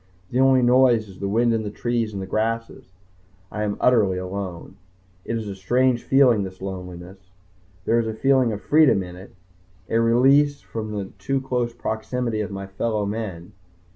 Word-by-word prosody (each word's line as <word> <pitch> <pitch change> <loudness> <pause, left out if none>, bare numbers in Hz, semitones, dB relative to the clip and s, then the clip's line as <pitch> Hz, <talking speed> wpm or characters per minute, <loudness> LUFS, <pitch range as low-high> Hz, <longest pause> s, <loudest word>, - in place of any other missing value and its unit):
The 125 - 0
only 130 -1 +5
noise 120 -3 +4
is 95 -2 -14
the 100 - -2
wind 115 +3 +2
in 115 - 0
the 105 - -4
trees 115 +1 -2
and 95 -2 -5
grasses. 115 +3 -2 0.7
I 105 - -4
am 105 -1 -2
utterly 105 -7 +3
alone. 95 -2 -6 0.5
It 115 - -2
is 110 -2 -5
a 100 - -4
strange 120 +6 +1
feeling, 130 -6 +4
this 95 -1 -6
loneliness. 90 -1 -8 0.7
There 115 - +3
is 115 - -1
a 110 - -4
feeling 130 0 +3
of 105 -1 -5
freedom 150 -10 +4
in 90 -1 -9
it, 95 +2 -13 0.6
a 115 - +3
release 135 +5 +4
from 110 -1 -6
the 100 -2 -5
too 135 +7 -1
close 125 -2 -2
proximity 115 0 -3
of 105 - -4
my 100 -1 -6
fellow 105 +2 -2
men. 100 -5 -5
110 Hz, 175 wpm, -23 LUFS, 100-125 Hz, 0.7 s, only